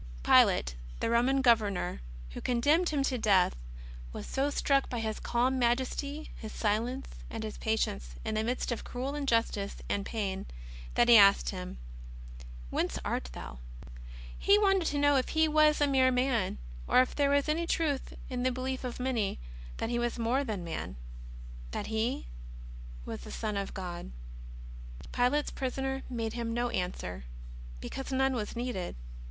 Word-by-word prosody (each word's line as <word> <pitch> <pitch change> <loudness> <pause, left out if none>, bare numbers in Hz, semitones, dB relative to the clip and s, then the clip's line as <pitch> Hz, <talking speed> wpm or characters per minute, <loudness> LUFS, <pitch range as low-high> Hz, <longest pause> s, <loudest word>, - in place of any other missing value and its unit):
Pilate, - - +5 0.3
the - - 0
Roman 260 +3 +3
Governor 210 - +2 0.3
who - - -7
condemned 290 +9 +3
Him 290 -3 +1
to 260 -2 0
death, 195 -5 +4 0.6
was - - -6
so 275 +2 0
struck 275 -1 +2
by 240 - -2
His 220 -1 -2
calm 255 +2 +1
majesty, 260 +5 -1
His 220 -2 -7
silence, 235 +5 -1
^ - - -13 0.2
and 225 -1 -5
His 215 -1 -6
patience 65 - -1
in - - -1
the 215 0 0
midst 245 +2 -1
of 235 - -3
cruel 260 +3 -4
injustice 230 -8 0
and 200 - -1
pain, 200 -3 -3 0.5
that 240 - +4
he 235 -1 +9
asked 200 -1 +6
Him: 180 - -6 0.5
" - - -13
Whence - - 0
art 60 - -2
Thou? 60 0 -8 0.4
" - - -13 0.3
He 400 +1 +5
wanted 390 -4 +3
to 290 - 0
know 290 -1 +4
if 255 - 0
He 315 0 +3
was 305 0 +4
a 290 - +4
mere 265 -2 +4
man, 250 - +1 0.3
or - - +5
if 255 - -7
there 285 -1 +3
was 285 0 +3
anv 330 +2 0
truth 290 -5 0
in 250 -1 -3
the 255 +1 +2
belief 260 +1 -3
of 250 -2 -4
manv, 250 -6 -1 0.4
that 225 - -2
He 240 - +1
was 240 0 -1
more 240 +4 +1
than 210 -8 -3
Man, 165 - -5 0.7
that - - -4
He 220 +3 0 0.8
was - - -5
the - - -9
Son 215 -2 -3
of 200 -1 -3
God. 180 - -5 1.0
Pilate's 270 +5 +1
Prisoner 270 0 -2
made 230 -3 -3
him 235 -1 -3
no 240 0 0
answer, 180 - -3 0.5
because 270 - -6
none 265 0 +2
was 220 -3 -3
needed. 235 -7 -3
240 Hz, 170 wpm, -31 LUFS, 210-270 Hz, 1.0 s, he